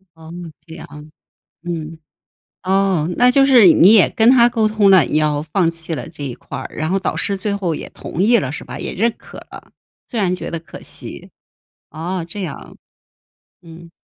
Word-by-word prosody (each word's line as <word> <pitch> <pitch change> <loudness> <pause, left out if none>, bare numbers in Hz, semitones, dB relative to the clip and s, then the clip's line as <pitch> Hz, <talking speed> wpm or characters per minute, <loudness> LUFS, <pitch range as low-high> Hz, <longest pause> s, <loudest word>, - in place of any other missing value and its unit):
哦， 160 0 -13 0.3
这 160 -1 -11
样。 - - -10 0.8
嗯， 165 -2 -6 0.7
哦， 190 -4 +1
那 245 +1 +5
就 270 +2 +4
是 250 -7 +6
你 195 +5 +6
也 210 -5 +6
跟 225 +1 +3
他 240 -2 +6
沟 225 -3 +1
通 215 -2 +2
了， 190 -4 +6
你 150 - -1
要 150 -1 +1
放 165 +3 0
弃 165 0 -6
了 155 - -5
这 145 - -10
一 135 -3 -4
块 - - -9
儿， - - -8
然 155 +1 -3
后 190 - +1
导 190 - -3
师 200 - -2
最 200 +1 -2
后 180 -5 -2
也 - - -8
同 170 - -6
意 235 +4 +4
了， 135 - -2
是 145 - -7
吧？ - - -8
也 - - -5
认 230 +3 0
可 - - -14
了， - - -13 0.4
虽 235 - -4
然 185 -3 +1
觉 - - -6
得 170 - -4
可 165 - -13
惜。 - - -9 0.6
哦， 170 +2 -4
这 200 +4 -7
样。 170 -7 -8 0.9
嗯。 170 0 -14
180 Hz, 215 characters per minute, -18 LUFS, 160-210 Hz, 0.9 s, 是